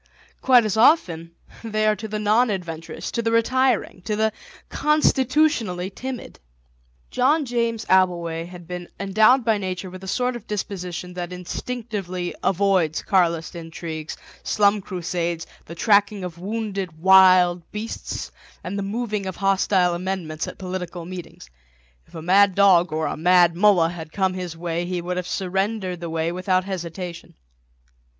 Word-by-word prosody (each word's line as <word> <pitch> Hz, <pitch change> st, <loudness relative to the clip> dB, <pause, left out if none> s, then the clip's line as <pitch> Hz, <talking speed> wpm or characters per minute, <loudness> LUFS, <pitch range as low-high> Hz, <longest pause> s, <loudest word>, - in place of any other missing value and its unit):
Quite 250 Hz, -3 st, +5 dB
as 215 Hz, 0 st, -1 dB
often 170 Hz, -, +3 dB, 0.3 s
they 215 Hz, -1 st, -1 dB
are 215 Hz, 0 st, +3 dB
to 220 Hz, +3 st, -6 dB
the 215 Hz, 0 st, -4 dB
non 215 Hz, +4 st, +3 dB
adventurous, 165 Hz, -3 st, -5 dB
to 235 Hz, -, -1 dB
the 225 Hz, 0 st, 0 dB
retiring, 235 Hz, -3 st, +1 dB
to 210 Hz, -, -1 dB
the 220 Hz, +1 st, +1 dB, 0.4 s
constitutionally 265 Hz, -, +1 dB
timid. 255 Hz, +4 st, -7 dB, 0.7 s
John 285 Hz, +5 st, +2 dB
James 235 Hz, -2 st, -1 dB
Abbleway 170 Hz, -3 st, +1 dB
had 175 Hz, -2 st, -12 dB
been 180 Hz, -1 st, -6 dB
endowed 215 Hz, +6 st, +4 dB
by 220 Hz, -3 st, +2 dB
Nature 185 Hz, -1 st, -4 dB
with 185 Hz, 0 st, -10 dB
the 190 Hz, -, -9 dB
sort 250 Hz, +5 st, 0 dB
of 240 Hz, -, -9 dB
disposition 180 Hz, -3 st, -5 dB
that 180 Hz, 0 st, -5 dB
instinctively 185 Hz, -1 st, -5 dB
avoids 185 Hz, -4 st, +1 dB
Carlist 170 Hz, -4 st, +1 dB
intrigues, 165 Hz, -1 st, -6 dB, 0.2 s
slum 205 Hz, 0 st, +2 dB
crusades, 175 Hz, -2 st, -3 dB, 0.2 s
the 170 Hz, -, -9 dB
tracking 205 Hz, +1 st, +2 dB
of 175 Hz, -2 st, -7 dB
wounded 200 Hz, -4 st, -4 dB
wild 185 Hz, 0 st, +6 dB
beasts, 215 Hz, +2 st, -5 dB, 0.3 s
and 200 Hz, +3 st, -4 dB
the -, -, -1 dB
moving 210 Hz, -1 st, -3 dB
of 190 Hz, -, -4 dB
hostile 195 Hz, -2 st, +2 dB
amendments 175 Hz, -3 st, -3 dB
at -, -, -8 dB
political 180 Hz, -2 st, -5 dB
meetings. 175 Hz, -, -9 dB, 0.6 s
If -, -, -17 dB
a 160 Hz, -, -7 dB
mad 195 Hz, +2 st, +4 dB
dog 185 Hz, -3 st, +5 dB
or 155 Hz, 0 st, -1 dB
a -, -, -2 dB
Mad 175 Hz, +1 st, +4 dB
Mullah 180 Hz, -3 st, +4 dB
had 160 Hz, -3 st, -8 dB
come 190 Hz, 0 st, 0 dB
his 180 Hz, -3 st, -6 dB
way 170 Hz, 0 st, -2 dB
he 180 Hz, 0 st, -3 dB
would 180 Hz, +1 st, -4 dB
have 180 Hz, -1 st, -3 dB
surrendered 190 Hz, 0 st, -2 dB
the 170 Hz, -1 st, -5 dB
way 165 Hz, +1 st, -1 dB
without 185 Hz, +1 st, 0 dB
hesitation. 180 Hz, -2 st, -6 dB
185 Hz, 150 wpm, -23 LUFS, 175-215 Hz, 0.7 s, wild